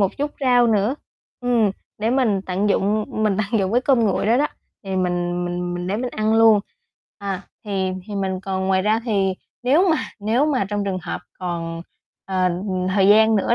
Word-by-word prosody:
một 195 -2 +1
chút 290 +1 -2
rau 245 -2 +4
nữa. 220 +3 +2 0.5
Ừm, 240 -4 +2 0.3
để 220 +2 0
mình 240 -7 +2
tận 190 +3 0
dụng, 210 +2 +1
mình 215 -3 0
tận 215 +2 0
dụng 190 +2 -1
cái 245 - +3
cơm 260 -2 +3
nguội 205 -2 +1
đó 230 - +4
đó, 290 +3 +3 0.4
thì 190 -1 -3
mình 175 -1 -1
mình 175 0 -3
mình 175 0 -4
để 195 +3 -1
mình 245 +2 -3
ăn 215 0 0
luôn. 225 -2 +6 0.6
À, 195 -2 -4 0.2
thì 190 -2 -1
thì 210 - -6
mình 190 -2 -2
còn 190 -1 -2
ngoài 190 0 +2
ra 215 +3 +2
thì 195 -5 +1 0.3
nếu 300 +10 +4
mà 320 - +3 0.2
nếu 230 +8 +2
mà 270 -8 +1
trong 205 0 -2
trường 190 -2 -2
hợp - - -4 0.2
còn, 165 -2 -4 0.4
ờ, 185 -1 +1 0.5
thời 195 -1 +4
gian 220 +1 +6
nữa 205 +3 +2
205 Hz, 200 wpm, -21 LUFS, 190-225 Hz, 0.6 s, luôn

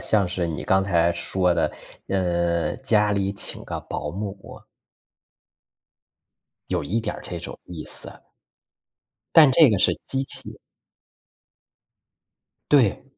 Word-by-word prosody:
像 100 -4 +2
是 90 -1 -2
你 80 -3 -4
刚 95 - +3
才 85 -3 +2
说 90 +1 +1
的， - - +1 0.4
嗯， 85 0 0
家 105 -4 +3
里 100 -1 0
请 100 - -1
个 - - -5
保 - - -4
姆。 100 0 -7 2.1
有 - - -1
一 100 +11 -1
点 110 -2 -4
儿 - - -9
这 90 - -5
种 85 - -8
意 85 -3 -8
思。 - - -6 1.2
但 155 -4 +8
这 145 +2 +7
个 105 - +2
是 - - +3
机 135 0 -1
器。 135 - -4 2.1
对。 130 -5 +3
95 Hz, 130 characters per minute, -23 LUFS, 85-105 Hz, 2.1 s, 但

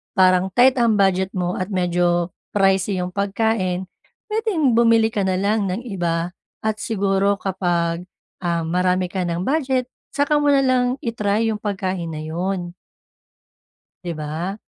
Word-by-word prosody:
parang 185 -1 +4
tight 255 +2 +5
ang 235 -2 +3
budget 190 -1 +2
mo 180 -1 -1
at 185 - -2
medyo 175 -2 +1 0.2
pricey 195 -1 +2
'yong 180 0 -3
pagkain, 200 -2 0 0.4
puwedeng 420 - +1
bumili 230 -1 +4
ka 205 -2 -1
na 185 - +1
lang 205 +1 +1
ng 185 +5 -2
iba 175 -5 -1 0.3
at 220 0 0
siguro 200 -2 +1
kapag, 175 -2 -1 0.4
um, 170 -1 0
marami 180 +1 +1
ka 190 -2 -1
ng 170 +1 -2
budget 265 -4 0 0.3
saka 290 +1 +2
mo 290 - +1
na 275 - +4
lang 255 -1 +3 0.2
i-try 225 -1 0
yung 210 - -4
pagkain 190 -4 -2
na 155 -1 -5
'yon. 175 +2 -3 1.3
'Di 175 - -3
ba? 155 +5 -4
190 Hz, 145 wpm, -21 LUFS, 180-225 Hz, 1.3 s, tight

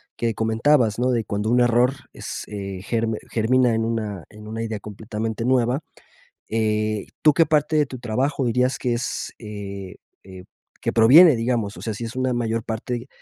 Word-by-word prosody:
que 115 -1 -1
comentabas, 115 +1 +2
¿no?, 125 +1 +2
de 120 -2 +1
cuando 105 +1 -2
un 120 +1 +3
error 120 +2 +3 0.2
es, - - -6
eh, 100 -2 -6
ger 115 +2 -1 0.2
germina 120 +2 +3
en 115 - 0
una 110 -6 -3
en 105 0 -12
una 110 +1 -5
idea 110 -2 -4
completamente 110 +2 -5
nueva, 125 0 +2 0.7
eh, 110 -1 0
¿tú 155 -2 +6
qué 165 +4 +4
parte 155 0 +1
de 150 - +4
tu 130 -1 -8
trabajo 130 +4 -1
dirías 125 +2 +1
que 125 -2 -1
es, 120 +1 -3
eh 100 -3 -7 0.3
eh, 95 -1 -11 0.4
que - - 0
proviene, 145 +8 +8
digamos? 115 -3 -1
O - - -9
sea, 110 - -3
si 105 - -6
es 115 - -7
una 130 0 0
mayor 115 -2 -1
parte 115 +2 -4
115 Hz, 180 wpm, -23 LUFS, 110-125 Hz, 0.7 s, proviene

